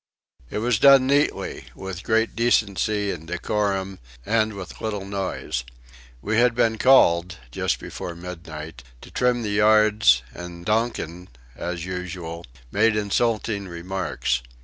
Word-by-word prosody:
It - - -4
was 115 0 +1
done 140 0 +7
neatly, 140 +2 0
with 95 -1 -6
great 115 +2 +1
decency 105 -3 +1
and 80 -1 -7
decorum, 95 +1 -2 0.3
and 110 0 +1
with 95 -3 -9
little 105 -3 -3
noise. 95 -9 -3 0.6
We 110 +2 0
had 120 0 +4
been 115 -2 +2
called 90 -9 +5
just - - 0
before 85 - -7
midnight 80 -4 -8 0.2
to - - -13
trim 125 -1 +1
the 105 - -2
yards, 105 - +4
and 85 0 -9
Donkin 105 -6 -1 0.3
as 85 +2 -4
usual 90 -2 -6 0.2
made 110 +1 +3
insulting 105 -1 0
remarks. 90 -7 -2
100 Hz, 125 wpm, -24 LUFS, 90-110 Hz, 0.6 s, done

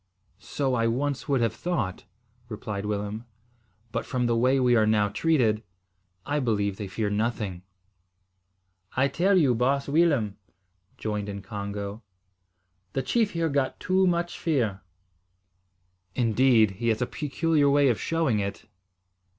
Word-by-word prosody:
"So 135 -3 -2
I 115 -2 +2
once 140 +5 -2
would 135 -3 +2
have 115 -2 +1
thought," 135 - -3 0.4
replied 105 -2 -5
Willem, 105 +2 -3 0.7
"but - - -2
from 125 -2 -1
the 120 -1 +2
way 130 +3 +3
we 125 -1 +4
are 110 -2 +4
now 105 -1 +3
treated, 115 -3 +2 0.6
I 145 +1 0
believe 105 -6 0
they 105 - -5
fear 105 +2 -2
nothing." 105 -4 -2 1.4
"I 135 +2 +4
tell 180 +8 +2
you, 140 -8 +4
baas 135 +4 +1
Willem," 140 -10 +2 0.6
joined 105 -1 -3
in 100 -1 -6
Congo, 100 0 -5 0.9
"the 135 - -1
chief 225 -3 +1
here 165 -1 0
got 140 -3 -1
too 185 +1 +2
much 175 0 -1
fear." 120 - 0 1.3
"Indeed! 115 -2 +4
He 120 - 0
has 115 +2 +2
a - - 0
peculiar 150 +1 +1
way 140 0 +4
of 115 - 0
showing 160 -10 +1
it." 100 0 -4
120 Hz, 140 wpm, -26 LUFS, 105-145 Hz, 1.4 s, we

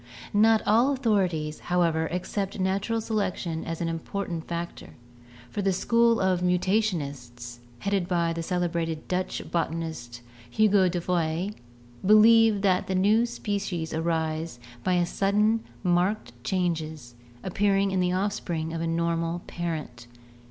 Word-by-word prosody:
Not 220 +1 +4
all 235 +6 +4
authorities, 185 - 0
however, 165 -2 +1
accept 195 +3 -3
natural 200 +4 0
selection 190 -7 -2
as 165 0 -5
an 170 - 0
im 165 0 -2
portant 175 -2 -5
factor, 170 0 -6 0.6
for 205 - -2
the 195 0 +2
School 230 +4 +3
of 185 -1 +1
Mutationists, 145 - -1 0.2
headed 195 +3 -1
by 170 -2 +1
the 165 - -3
cele 180 +1 0
brated 165 -2 -2
Dutch 185 0 -2
botanist, 160 -8 -3 0.3
Hugo 200 - +4
de 175 0 -2
Vries, 175 +2 -1 0.5
believe 215 0 +6
that 185 -2 +2
new 205 +5 +3
species 200 -7 -3
arise 160 -3 -2 0.2
by 180 +2 +2
sudden 210 +5 +2 0.2
marked 180 - +1
changes 160 -5 -2 0.3
appearing 195 +1 +1
in 190 - 0
the 180 0 +2
offspring 180 -4 -2
of 165 - -3
a 165 - -1
normal 170 +1 -1
parent. 155 -9 -5
180 Hz, 130 wpm, -26 LUFS, 165-200 Hz, 0.6 s, believe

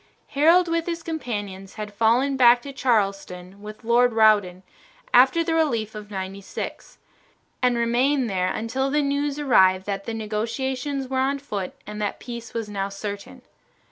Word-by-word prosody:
Harold 335 +5 +4
with 335 0 -1
his 335 -1 -3
companions 205 - -5
had 210 -1 -6
fallen 235 +6 +2
back 245 -2 +5
to 280 - -8
Charleston 195 -6 -1
with 215 +2 -10
Lord 240 +1 +3
Rawdon 205 -5 +3 0.5
after 265 +7 +5
the 330 0 -1
relief 235 -10 0
of 210 -1 -9
Ninety 195 0 -5
six, - - -7 0.6
and 250 -1 +2
remained 245 +3 +1
there 185 -3 0
until 260 +5 -2
the 295 +1 +1
news 285 0 -1
arrived 190 -10 +4
that 200 -1 -4
the 230 - -4
negotiations 255 +6 -3
were 260 0 -1
on 275 +2 +1
foot 205 -10 -5
and 210 +1 -7
that 205 - -2
peace 235 -2 -8
was 230 -2 -4
now 200 -1 -3
certain. 200 0 -7
230 Hz, 160 wpm, -24 LUFS, 205-270 Hz, 0.6 s, back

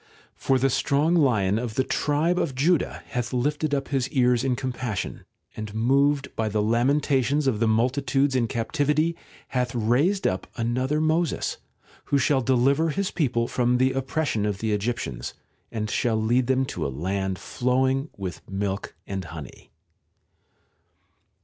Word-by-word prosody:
X - - -30 0.2
For 135 - +1
the 135 +1 +2
strong 145 +6 +2
lion 110 - +3
of 115 -2 -4
the 130 - +2
tribe 155 +6 +1
of 135 -5 -1
Judah 160 +5 +1
hath 125 -1 -2
lifted 145 +4 0
up 135 -1 -3
his 130 -2 0
ears 125 -3 +2
in 130 -2 +1
compassion, 125 -5 -4 0.3
and 110 -1 -6
moved 140 +4 +2
by 110 -1 0
the 105 +1 -1
lamentations 135 +4 +2
of 125 -6 +1
the 115 - +2
multitudes 130 +4 +1
in 120 -3 +2
captivity 150 +8 0 0.3
hath 125 -2 -1
raised 130 - +2
up 95 - 0
another 130 +5 0
Moses, 160 +2 0 0.5
who 140 - +2
shall 135 0 +2
deliver 135 +5 +2
his 195 +4 -1
people 120 -8 0
from 125 0 +1
the 130 +1 +3
oppression 135 -3 -1
of 105 -2 -1
the 110 +2 -2
Egyptians, 100 - -3 0.4
and 110 -2 -2
shall 110 0 0
lead 120 +3 +2
them 130 0 +2
to 90 -10 -4
a 70 - -1
land 95 +6 -2 0.2
nowing 130 +3 +2
with 95 -3 -5
milk 100 0 -3
and 95 -2 -4
honey. 80 -4 -10
125 Hz, 155 wpm, -25 LUFS, 110-140 Hz, 0.5 s, lion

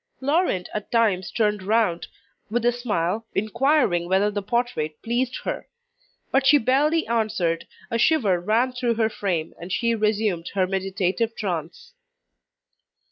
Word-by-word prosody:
Laurent 280 - +1
at 210 -1 -5
times 210 -6 +2
turned 210 -3 0
round, 205 -3 +1 0.4
with 235 +2 -1
a 240 - +5
smile, 220 -3 -2
inquiring 220 - +1
whether 195 +2 +3
the 205 0 -2
portrait 210 -9 -2
pleased 245 +2 -1
her. - - -4 0.6
But 270 0 +3
she 295 - +7
barely 290 +6 +2
answered, 195 -8 -1 0.2
a 230 - 0
shiver 225 - +3
ran 225 +8 +1
through 245 -2 0
her 220 -1 +2
frame, 175 -7 -2
and 175 +2 -7
she 235 +4 +1
resumed 210 -5 0
her 190 -1 +3
meditative 195 +4 -1
trance. 185 - -5
215 Hz, 135 wpm, -24 LUFS, 185-240 Hz, 0.6 s, she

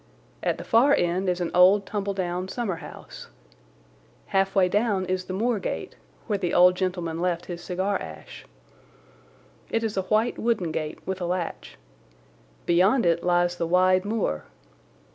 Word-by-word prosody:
At - - 0
the - - -7
far 260 +6 +4
end 180 +2 0
is 180 0 -1
an 175 - -2
old 190 +3 +5
tumble 200 -1 -3
down 180 -1 -2
summer 200 -4 -3
house. 165 - -11 1.0
Halfway 195 -1 +2
down 205 -1 +1
is 185 0 -2
the 185 - -5
moor 225 +3 0
gate, 80 - -5 0.3
where 205 - -1
the 175 -3 -1
old 180 +1 +7
gentleman 180 -3 -3
left 175 -1 -1
his 175 -1 -7
cigar 190 +3 -1
ash. - - -10 1.2
It 225 - -1
is 220 -2 -2
a - - +2
white 220 +3 +1
wooden 215 -8 0
gate 155 -1 -4
with 190 0 -4
a 175 - -1
latch. 175 -1 -4 0.9
Beyond 190 +7 +3
it 170 0 +2
lies 175 0 +2
the 170 - -1
wide 185 +1 +3
moor. 205 - -2
185 Hz, 160 wpm, -25 LUFS, 175-200 Hz, 1.2 s, old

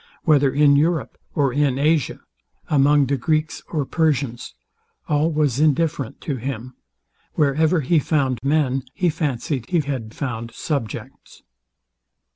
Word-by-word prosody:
Whether 145 -4 +4
in 145 0 +4
Europe 155 -4 0 0.2
or 140 -4 +1
in 140 -2 +1
Asia, 150 0 +1 0.5
among 145 0 +4
Greeks 155 +4 -1
or 150 -4 -2
Persians, 135 -6 -1 0.5
all 150 +2 +2
was 145 -4 +1
indifferent 155 -3 +1
to 140 -4 -3
him: 130 0 -5 0.6
Wherever 155 +3 +2
he 155 +4 +2
found 135 -5 0
men, 135 -2 +1
he 180 -2 +1
fancied 140 -4 -3
he 175 - +2
found 120 -3 -4
subjects." 140 -9 -5
145 Hz, 115 wpm, -22 LUFS, 130-155 Hz, 0.6 s, Whether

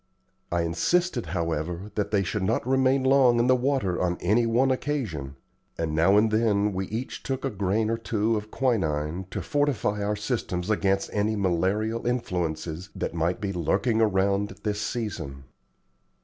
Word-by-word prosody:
I 85 -1 +1
insisted, 125 - 0
however, 85 +4 -3
that 105 - -1
they 100 -2 +2
should 95 +3 -2
not 110 +5 0
remain 130 0 +3
long 130 -2 +5
in 120 - +3
the 130 +1 +5
water 125 -8 0
on 90 -1 0
any 110 +6 +2
one 125 +4 +3
occasion, 110 - -3 0.4
and 80 -2 -2
now 85 +6 +4
and 110 +1 +4
then 105 -2 +2
we 95 0 -2
each 115 +5 -5
took 135 0 -3
a 135 - -1
grain 100 +2 0
or 115 +1 -1
two 110 0 0
of 105 0 -4
quinine 90 - -1
to - - -4
fortify 145 -8 0
our 105 +1 0
systems 105 -4 -2
against 100 -2 +1
any 105 +1 +1
malarial 100 +5 0
influences 90 -6 -2
that - - -3
might 85 +2 0
be 100 -1 -3
lurking 110 +7 +1
around 100 -1 +2
at - - -15
this 105 -1 -1
season. 100 - -4
105 Hz, 165 wpm, -26 LUFS, 90-120 Hz, 0.4 s, long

